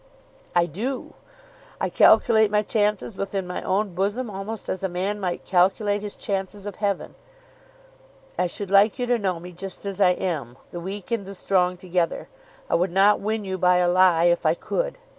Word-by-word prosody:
"I 175 -1 +4
do. 230 - -4 0.7
I - - -1
calculate 220 -2 +5
my 210 0 +2
chances 210 -1 0
within 195 -1 -3
my 180 - -5
own 195 0 -1
bosom 205 +6 -1
almost 195 +2 -6
as 190 - -3
a 190 - -1
man 190 +4 -2
might 180 -3 -3
calculate 200 +3 +2
his 205 -1 -6
chances 195 0 -4
of 205 -2 -6
heaven. 200 -3 -2 1.2
I 180 - +1
should 195 +2 -5
like 200 +3 +5
you 250 - -1
to 245 -1 +1
know 185 -4 -1
me 180 +2 -10
just 190 +3 -8
as 200 0 -4
I 180 -2 +6
am, 150 -11 -4
the 175 - -6
weak 195 +5 -7
and 230 -3 0
the 195 +1 -8
strong 180 -1 +1
together. 180 -1 -2 0.4
I - - -3
would 180 +3 +2
not 195 +3 +4
win 215 0 -2
you 190 -1 -4
by 180 0 +4
a 180 0 +3
lie 175 -2 +4
if 175 0 +3
I 160 0 +3
could. - - -3
195 Hz, 190 wpm, -24 LUFS, 180-205 Hz, 1.2 s, I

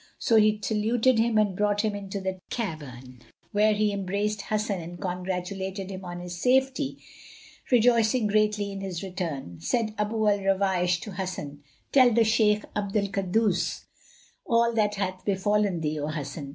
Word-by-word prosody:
So 225 - +3
he 215 0 +4
saluted 225 +3 +2
him 225 -1 +2
and 205 -3 +2
brought 205 +1 +1
him 215 -1 0
into 200 0 -5
the 190 -1 -4
cavern, 130 - -6 0.3
where 210 +1 +3
he 210 0 +1
embraced 200 +2 -2
Hasan 210 -3 -2
and 175 +1 -9
congratulated 190 +1 -4
him 190 0 -7
on 175 -1 -6
his 175 0 -7
safety, 265 +2 +2 0.7
rejoicing 235 -1 +4
greatly 210 -1 +1
in 195 0 -6
his 190 -2 -5
return. 165 - -5
Then - - -18
said 220 - 0
Abu 215 +1 0
al 205 -1 +3
Ruwaysh 190 -2 +1
to 210 - -7
Hasan, 180 -6 -5 0.3
"Tell 255 -3 +6
the 230 0 +4
Shaykh 215 -1 +2
Abd 200 0 -1
al 200 -1 +1
Kaddus 190 -2 0 0.6
all 235 0 +2
that 210 -2 +1
hath 185 -2 -3
befallen 200 -2 +1
thee, 155 0 -2
O 145 - -2
Hasan." 150 -1 -5
200 Hz, 165 wpm, -26 LUFS, 180-215 Hz, 0.7 s, Tell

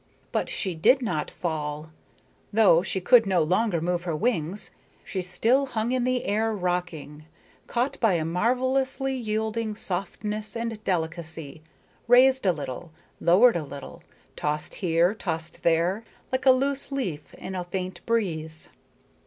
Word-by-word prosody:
But - - -1
she 190 -3 -2
did 245 - +4
not 160 -9 -1
fall. 155 -1 -4 0.6
Though 200 -6 +5
she 190 - -2
could 230 +3 +5
no 180 -4 +3
longer 185 +2 +1
move 175 +1 -1
her 170 -3 -2
wings, 200 -2 -1 0.3
she 190 - -3
still 225 +10 +2
hung 230 -2 -1
in 255 -1 +1
the 255 -1 0
air 220 +2 +1
rocking, 175 -5 -3 0.4
caught 245 +3 -1
by 225 -5 +3
a 160 -2 0
marvelously 260 - 0
yielding 220 -2 -2
softness 210 +3 -4
and 230 -2 -4
delicacy, 165 -4 -3 0.5
raised 255 -1 +5
a - - +6
little, 150 +1 -6 0.3
lowered 205 +8 +5
a 170 - -1
little, 140 -1 -9 0.3
tossed 150 0 -2
here, 175 +1 +3
tossed 165 -6 -5
there, 170 +6 +2 0.3
like 260 +1 -1
a - - +10
loose 275 +2 0
leaf 185 - -4
in 190 - -7
a 180 -1 -2
faint 185 +1 -5
breeze. 160 -9 -2
190 Hz, 145 wpm, -26 LUFS, 165-230 Hz, 0.6 s, a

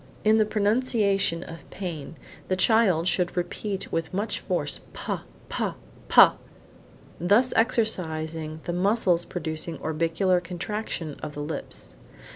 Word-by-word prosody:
In 220 +1 +5
the 215 - +3
pronunciation 205 -5 +1
of 165 0 -11
pane, 165 -5 -6 0.3
the 185 - +1
child 190 -5 +3
should 180 -1 0
repeat 190 +3 -3
with 165 -1 -2
much 205 +3 -2
force, 175 -6 -1
pa, - - -4 0.2
pa, - - -2 0.3
pa, - - +8 0.8
thus 205 +9 +3
exercising 160 -9 0
the 175 - -3
muscles 180 -2 +2
producing 160 -1 -4
orbicular 165 +4 +1
contraction 175 -2 -4
of 150 - -6
the 145 - -4
lips. 145 - -4
180 Hz, 120 wpm, -26 LUFS, 160-210 Hz, 0.8 s, pa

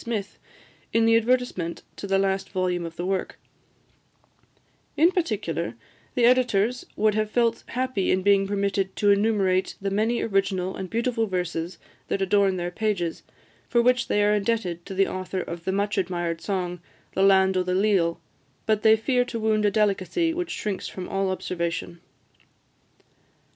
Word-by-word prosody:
Smith, 210 -4 -4 0.5
in 225 0 +3
the 225 0 +5
advertisement 230 -7 0
to 200 - -6
the 195 0 +2
last 195 0 0
volume 180 -2 -1
of 165 - -10
the 175 - -4
work: 190 0 -2 1.6
"In 330 +4 +5
particular, 205 - -2 0.4
the 245 - +4
editors 245 -1 +2
would 215 0 +2
have 215 0 0
felt 230 0 +1
happy 255 -5 -1
in 185 0 +2
being 200 0 +4
permitted 195 -1 -1
to 205 -1 +3
enumerate 200 -3 +2
the 195 0 -2
many 220 +4 +1
original 195 -3 0
and 190 - -6
beautiful 230 +1 0
verses 175 -2 -3 0.3
that - - -1
adorn 195 0 +2
their 175 0 -3
pages, 185 -4 -2 0.5
for 240 - +3
which 250 +1 +3
they 205 - +2
are 210 0 +3
indebted 200 -5 -1
to 195 - -6
the 195 +1 +4
author 185 0 -4
of 170 0 -7
the 190 - 0
much 200 +1 0
admired 175 -2 -2
song, 180 -3 -3 0.3
'The 190 - 0
Land 190 -1 +5
o' 185 - +2
the 180 0 -1
Leal;' 190 -4 +2 0.5
but 215 -1 +1
they 220 0 +6
fear 245 +3 +1
to 235 -2 -5
wound 215 -1 +1
a - - +5
delicacy 210 - +1
which 350 0 -3
shrinks 200 -3 -3
from 185 -1 -7
all 195 0 -1
observation." 170 -2 -3
195 Hz, 165 wpm, -25 LUFS, 185-220 Hz, 1.6 s, they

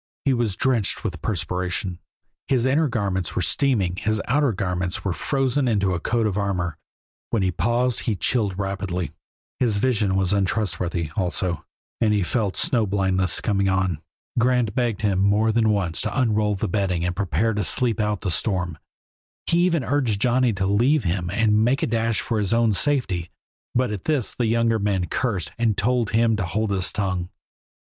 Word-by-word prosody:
He 135 - +3
was 115 -5 0
drenched 125 -4 +1
with - - -4
perspiration, 90 0 -2 0.5
his 130 -3 +2
inner 145 +4 +3
garments 100 - -2
were 90 - 0
steaming, 95 - +1
his 110 +2 0
outer 140 +1 +2
ones 90 -2 -2
were 95 - 0
frozen 135 +4 0
into 100 -5 +1
a 90 - -1
coat 115 +5 0
of 105 -1 0
armor; 90 -5 -2 0.5
when 110 -4 0
he 95 - +1
paused 120 +8 0
he 110 - -1
chilled 100 -3 0
rapidly. 95 -3 -3 0.5
His 115 -5 +2
vision 105 -4 +1
was 95 0 +1
untrustworthy, 90 -5 -1
also, 90 -2 -1 0.3
and 110 -2 +3
he 100 - +1
felt 105 0 -1
snow 120 -10 +1
blindness 95 -2 +1
coming 100 -2 +1
on. 95 -4 0 0.4
Grant 125 -3 +2
begged 120 -5 -1
him 100 -3 +2
more 105 +3 +3
than 110 0 +2
once 95 -6 0
to 110 +4 -2
unroll 105 -4 +2
the 95 - -2
bedding 90 -3 0
and 90 0 -1
prepare 105 +4 0
to 105 0 -1
sleep 115 +2 +1
out 105 -2 0
the 95 - -2
storm; 90 -4 -1 0.7
he 170 - +2
even 170 -5 +2
urged 125 -5 0
Johnny 125 +2 +2
to 95 -1 -1
leave 120 +8 +3
him 85 -1 -1
and 110 +1 +3
make 125 +4 +1
a - - +4
dash 115 -1 0
for 115 -3 -1
his 100 0 0
own 115 -2 +3
safety, 95 - 0 0.5
but 125 -2 +1
at 100 -4 -5
this 145 -7 +1
the 120 - -1
younger 115 0 +2
man 100 -3 0
cursed 100 - -2
and 115 -3 +1
told 120 +1 +1
him 115 0 +2
to 100 - -1
hold 105 +4 -1
his 95 -1 0
tongue. 95 -3 -2
105 Hz, 180 wpm, -23 LUFS, 95-120 Hz, 0.7 s, a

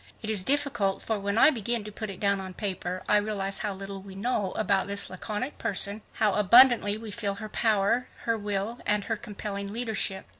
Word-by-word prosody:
It 215 - -1
is 200 -4 +2
difficult, 255 -7 +1
for 220 -2 -1
when 200 +2 -2
I 305 - +7
begin 235 -3 -1
to 210 - -8
put 215 +1 -6
it 190 - -8
down 200 -1 +1
on 185 -1 -8
paper, 185 -3 -4
I 210 - +5
realize 200 -2 -1
how 210 -2 -2
little 195 0 -7
we 195 0 -11
know 205 -2 -1
about 200 -3 +1
this 200 -1 0
laconic 210 +8 -4
person, 200 -2 +2
and - - -15
yet - - -24
how 210 -3 +2
abundantly 215 +1 +6
we 220 -1 -8
feel 200 -1 -2
her 215 +1 -7
power, 220 +3 +1 0.2
her 230 - +1
will 205 +2 -3
and 210 0 +1
her 225 - -2
compelling 200 -1 -6
leadership. 215 -4 -2
205 Hz, 215 wpm, -27 LUFS, 195-220 Hz, 0.2 s, I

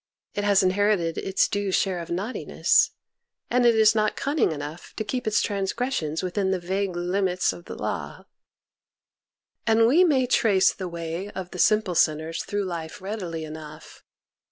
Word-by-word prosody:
It 205 - -2
has 200 -1 +4
inherited 185 -3 +1
its 190 0 +1
due 200 -1 -2
share 185 -1 +1
of 170 - -7
naughtiness, 195 +8 +1 0.6
and 245 0 +4
it 235 - +5
is 220 -1 +5
not 215 -1 +1
cunning 280 - +1
enough 150 +2 -7
to 220 - -2
keep 250 +3 -3
its 215 - +2
transgres 205 +6 -2
sions 155 -4 -2
within 190 +1 -1
the 190 - +1
vague 190 +1 -2
limits 180 +1 0
of 175 - -12
the - - -7
law. - - -5 1.4
And 225 0 +5
we 300 +10 +5
may 275 -7 +3
trace 210 -6 +3
the 185 -2 -6
way 170 +3 -5
of 185 -3 -7
the 180 - -8
simple 215 -2 +3
sinners 160 0 +1
through 205 -1 -2
life 165 -3 -6
readily 185 -5 -5
enough. 155 -1 -10
190 Hz, 165 wpm, -25 LUFS, 170-215 Hz, 1.4 s, it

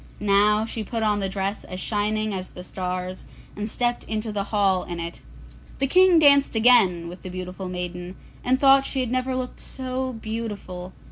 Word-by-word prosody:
Now 210 +1 +3
she 225 -1 -4
put 225 +2 -3
on 210 -1 +2
the 195 -1 -1
dress 195 +1 -3
as 185 - -7
shining 215 +1 -1
as 185 -1 -5
the 180 - -10
stars, 185 0 -4 0.3
and 210 +2 -4
stepped 240 +2 0
into 215 0 -3
the 200 -1 -2
hall 200 -3 +2
in 175 -1 -6
it. 170 0 -6 0.6
The 275 - +1
King 365 +4 +5
danced 280 -4 +5
again 220 -8 +5
with 175 +2 -9
the 185 - -7
beautiful 185 +1 -6
maiden, 180 0 -5 0.3
and 260 +1 +2
thought 275 0 +6
she 270 -1 -2
had 245 -2 -2
never 255 0 0
looked 255 -1 -4
so 260 0 -3
beautiful. 210 -5 -6
210 Hz, 185 wpm, -24 LUFS, 185-245 Hz, 0.6 s, thought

